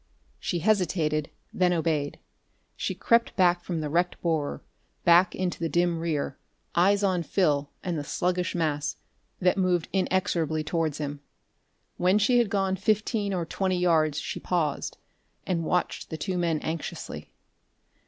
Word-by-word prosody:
She 175 Hz, -, -2 dB
hesitated, 165 Hz, -6 st, +1 dB, 0.2 s
then 180 Hz, -1 st, +3 dB
obeyed. 155 Hz, -4 st, 0 dB, 0.6 s
She -, -, -2 dB
crept 230 Hz, 0 st, +2 dB
back 175 Hz, -2 st, +3 dB
from 170 Hz, -3 st, -3 dB
the 150 Hz, -, -2 dB
wrecked 175 Hz, +4 st, 0 dB
borer, 160 Hz, -4 st, -1 dB, 0.4 s
back 175 Hz, +1 st, +6 dB
into 185 Hz, -2 st, -2 dB
the 165 Hz, -1 st, -1 dB
dim 175 Hz, +1 st, +1 dB
rear, 155 Hz, -5 st, -2 dB, 0.3 s
eyes 200 Hz, +4 st, +3 dB
on 185 Hz, -3 st, +2 dB
Phil 150 Hz, -5 st, +1 dB
and 175 Hz, -4 st, -2 dB
the -, -, -4 dB
sluggish 180 Hz, +3 st, -1 dB
mass 150 Hz, -3 st, -1 dB, 0.4 s
that 185 Hz, +1 st, +2 dB
moved 180 Hz, -3 st, +1 dB
inexorably 170 Hz, -5 st, +1 dB
towards 160 Hz, -2 st, -1 dB
him. 145 Hz, -1 st, -4 dB, 0.8 s
When 185 Hz, +3 st, +3 dB
she 240 Hz, +4 st, +4 dB
had 235 Hz, -4 st, +2 dB
gone 195 Hz, -1 st, 0 dB
fifteen 210 Hz, +1 st, 0 dB
or 180 Hz, -3 st, -1 dB
twenty 185 Hz, +2 st, -1 dB
yards 160 Hz, -4 st, +2 dB
she -, -, -4 dB
paused, 160 Hz, -5 st, -1 dB, 0.5 s
and 170 Hz, -3 st, 0 dB
watched 180 Hz, +2 st, -1 dB
the 160 Hz, -, -4 dB
two 185 Hz, +4 st, -3 dB
men 170 Hz, -3 st, +1 dB
anxiously. 160 Hz, 0 st, -5 dB
175 Hz, 145 wpm, -27 LUFS, 155-185 Hz, 0.8 s, back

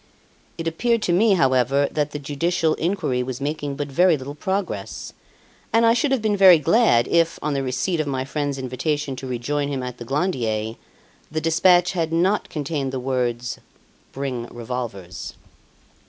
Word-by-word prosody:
It 165 Hz, -, -4 dB
appeared 230 Hz, +7 st, +1 dB
to 175 Hz, -, +1 dB
me, 210 Hz, +4 st, +4 dB
however, 135 Hz, -2 st, +3 dB
that 150 Hz, -1 st, 0 dB
the 145 Hz, -, -5 dB
judicial 160 Hz, +3 st, 0 dB
inquiry 160 Hz, -8 st, -1 dB
was 125 Hz, 0 st, -4 dB
making 145 Hz, 0 st, -3 dB
but 145 Hz, 0 st, -3 dB
very 170 Hz, +4 st, +3 dB
little 135 Hz, +1 st, -7 dB
progress; 185 Hz, -, -4 dB, 0.6 s
and 230 Hz, +1 st, +4 dB
I 230 Hz, -, +6 dB
should 245 Hz, +4 st, +1 dB
have 260 Hz, -5 st, +1 dB
been 215 Hz, -1 st, +2 dB
very 190 Hz, -3 st, +8 dB
glad, 160 Hz, -, +3 dB
if, 165 Hz, -1 st, +2 dB
on 150 Hz, 0 st, 0 dB
the 140 Hz, -, 0 dB
receipt 135 Hz, +7 st, -1 dB
of 155 Hz, -, -1 dB
my 130 Hz, -2 st, -2 dB
friend's 145 Hz, 0 st, -2 dB
invitation 135 Hz, +2 st, -2 dB
to 130 Hz, -, -6 dB
rejoin 140 Hz, +4 st, -2 dB
him 135 Hz, -3 st, -3 dB
at 125 Hz, -1 st, -6 dB
the -, -, -6 dB
Glandier, 115 Hz, -, -1 dB, 0.6 s
the 155 Hz, -, -2 dB
despatch 175 Hz, +3 st, +4 dB
had 165 Hz, -3 st, -1 dB
not 185 Hz, +5 st, +1 dB
contained 145 Hz, -3 st, -3 dB
the 130 Hz, -, -3 dB
words, 125 Hz, -2 st, -2 dB, 0.5 s
"Bring 130 Hz, -3 st, -4 dB
revolvers." 120 Hz, -6 st, -6 dB
145 Hz, 170 wpm, -22 LUFS, 130-170 Hz, 0.6 s, very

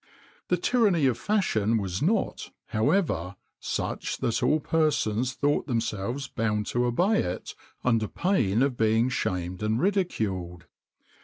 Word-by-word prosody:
[XXIX -, -, -29 dB
33] 180 Hz, -, +4 dB
The 175 Hz, -, -9 dB
tyranny 205 Hz, -, +3 dB
of 125 Hz, -3 st, +2 dB
fashion 115 Hz, -, +1 dB
was 95 Hz, -3 st, -3 dB
not, 200 Hz, +6 st, 0 dB, 0.2 s
however, 110 Hz, -, 0 dB, 0.2 s
such -, -, -3 dB
that 115 Hz, -, -1 dB
all 155 Hz, -, +3 dB
persons 130 Hz, -7 st, +1 dB
thought 145 Hz, +2 st, 0 dB
themselves 120 Hz, +2 st, -2 dB
bound 105 Hz, -2 st, -1 dB
to 120 Hz, +3 st, 0 dB
obey 180 Hz, -, +2 dB
it 90 Hz, +1 st, -4 dB, 0.3 s
under 115 Hz, -3 st, +2 dB
pain 125 Hz, -, +1 dB
of 135 Hz, -2 st, 0 dB
being 110 Hz, +2 st, +2 dB
shamed 90 Hz, -6 st, -2 dB
and 110 Hz, +2 st, 0 dB
ridiculed. 100 Hz, -, -1 dB
120 Hz, 140 wpm, -27 LUFS, 105-160 Hz, 0.3 s, 33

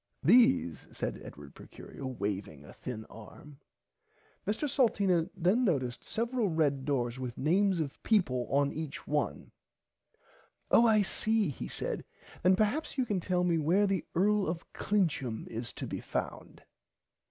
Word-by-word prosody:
These 235 Hz, -, +4 dB
said -, -, -4 dB
Edward 70 Hz, 0 st, -11 dB
Procurio 135 Hz, -, -9 dB
waving 100 Hz, -, -4 dB
a -, -, -12 dB
thin 110 Hz, -3 st, -7 dB
arm. 135 Hz, +6 st, -13 dB, 0.9 s
Mr 220 Hz, +8 st, 0 dB
Salteena 200 Hz, -, +2 dB
then 190 Hz, +8 st, +3 dB
noticed 130 Hz, -, 0 dB
several 230 Hz, -1 st, -1 dB
red 145 Hz, -5 st, +1 dB
doors 125 Hz, -3 st, -1 dB
with 125 Hz, -2 st, -5 dB
names 185 Hz, +5 st, +2 dB
of 150 Hz, -3 st, -4 dB
people 130 Hz, -, +1 dB
on 140 Hz, 0 st, +2 dB
each 155 Hz, -2 st, -6 dB
one. 150 Hz, 0 st, -2 dB, 1.2 s
Oh 235 Hz, -, +7 dB
I 215 Hz, -2 st, +5 dB
see 215 Hz, -1 st, 0 dB
he 125 Hz, -, -5 dB
said -, -, -4 dB, 0.4 s
then 185 Hz, +1 st, +5 dB
perhaps 220 Hz, +11 st, 0 dB
you 260 Hz, -, +2 dB
can 205 Hz, -5 st, -1 dB
tell 180 Hz, 0 st, 0 dB
me 170 Hz, -2 st, +2 dB
where 175 Hz, +7 st, +3 dB
the 195 Hz, -2 st, 0 dB
Earl 205 Hz, +3 st, +3 dB
of 165 Hz, +1 st, -5 dB
Clincham 150 Hz, -, 0 dB
is 115 Hz, +1 st, -5 dB
to -, -, -5 dB
be -, -, -5 dB
found. -, -, -5 dB
165 Hz, 145 wpm, -31 LUFS, 130-205 Hz, 1.2 s, Oh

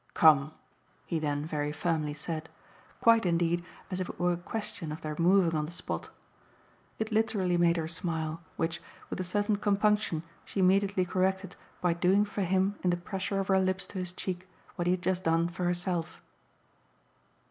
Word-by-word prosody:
"Come!" 155 Hz, -2 st, +6 dB, 0.5 s
he 165 Hz, -, -1 dB
then 145 Hz, -1 st, -1 dB
very 150 Hz, -2 st, -2 dB
firmly 150 Hz, -1 st, -1 dB
said 160 Hz, +1 st, -5 dB, 0.5 s
quite 230 Hz, -1 st, +6 dB
indeed 170 Hz, -1 st, +1 dB, 0.3 s
as 185 Hz, -, -2 dB
if 185 Hz, -, -2 dB
it -, -, -8 dB
were 175 Hz, 0 st, +3 dB
a -, -, -2 dB
question 175 Hz, -3 st, -4 dB
of 155 Hz, -, -6 dB
their 155 Hz, -1 st, -4 dB
moving 175 Hz, 0 st, +4 dB
on 150 Hz, -1 st, 0 dB
the -, -, -8 dB
spot. 180 Hz, +1 st, -5 dB, 0.9 s
It 220 Hz, +1 st, -2 dB
literally 210 Hz, -5 st, +2 dB
made 170 Hz, 0 st, +4 dB
her 160 Hz, -1 st, -1 dB
smile, 165 Hz, -1 st, -2 dB, 0.2 s
which, 165 Hz, +1 st, -1 dB, 0.3 s
with -, -, -3 dB
a -, -, 0 dB
certain 205 Hz, +3 st, 0 dB
compunction, 205 Hz, -5 st, +2 dB, 0.2 s
she -, -, -5 dB
immediately 195 Hz, 0 st, +3 dB
corrected 190 Hz, +1 st, 0 dB, 0.3 s
by 175 Hz, -1 st, +3 dB
doing 185 Hz, +4 st, +3 dB
for 205 Hz, 0 st, -4 dB
him 190 Hz, +2 st, +1 dB
in 180 Hz, -, +3 dB
the 175 Hz, -, +2 dB
pressure 190 Hz, +2 st, -3 dB
of 195 Hz, -, -2 dB
her 190 Hz, 0 st, +5 dB
lips 185 Hz, 0 st, 0 dB
to 190 Hz, -, -3 dB
his 180 Hz, -1 st, -2 dB
cheek 185 Hz, 0 st, -5 dB, 0.3 s
what 175 Hz, -, -1 dB
he -, -, +4 dB
had 185 Hz, 0 st, -3 dB
just 185 Hz, 0 st, 0 dB
done 165 Hz, +1 st, +3 dB
for 180 Hz, +1 st, -3 dB
herself. 175 Hz, -1 st, -1 dB
180 Hz, 180 wpm, -30 LUFS, 165-190 Hz, 0.9 s, Come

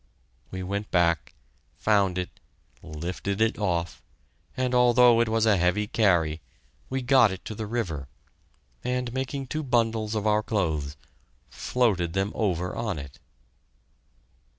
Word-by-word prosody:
We 95 Hz, 0 st, -5 dB
went 100 Hz, +2 st, -3 dB
back, 85 Hz, -3 st, +1 dB, 0.4 s
found 100 Hz, -4 st, +2 dB
it, 90 Hz, -1 st, -5 dB, 0.4 s
and 75 Hz, -, -10 dB
lifted 90 Hz, +5 st, -3 dB
it 110 Hz, -1 st, +1 dB
off, 85 Hz, -4 st, -1 dB, 0.6 s
and 130 Hz, -1 st, 0 dB
although 125 Hz, -1 st, +6 dB
it 115 Hz, -, +1 dB
was 115 Hz, 0 st, +2 dB
a 105 Hz, -3 st, +4 dB
heavy 90 Hz, +4 st, +1 dB
carry, 85 Hz, -8 st, +2 dB, 0.5 s
we 130 Hz, 0 st, -2 dB
got 125 Hz, -4 st, +5 dB
it 95 Hz, -, -8 dB
to 110 Hz, -, -5 dB
the 110 Hz, 0 st, -5 dB
river, 85 Hz, -, -3 dB, 0.8 s
and, 125 Hz, -1 st, -2 dB
making 135 Hz, +1 st, -3 dB
two 155 Hz, +4 st, -3 dB
bundles 115 Hz, -5 st, 0 dB
of 105 Hz, -1 st, -2 dB
our 105 Hz, 0 st, +3 dB
clothes, 80 Hz, -10 st, -2 dB, 0.5 s
floated 95 Hz, -9 st, 0 dB
them 95 Hz, +2 st, 0 dB
over 90 Hz, -4 st, -1 dB
on 105 Hz, -7 st, -2 dB
it. 70 Hz, -3 st, -9 dB
105 Hz, 140 wpm, -26 LUFS, 90-115 Hz, 0.8 s, although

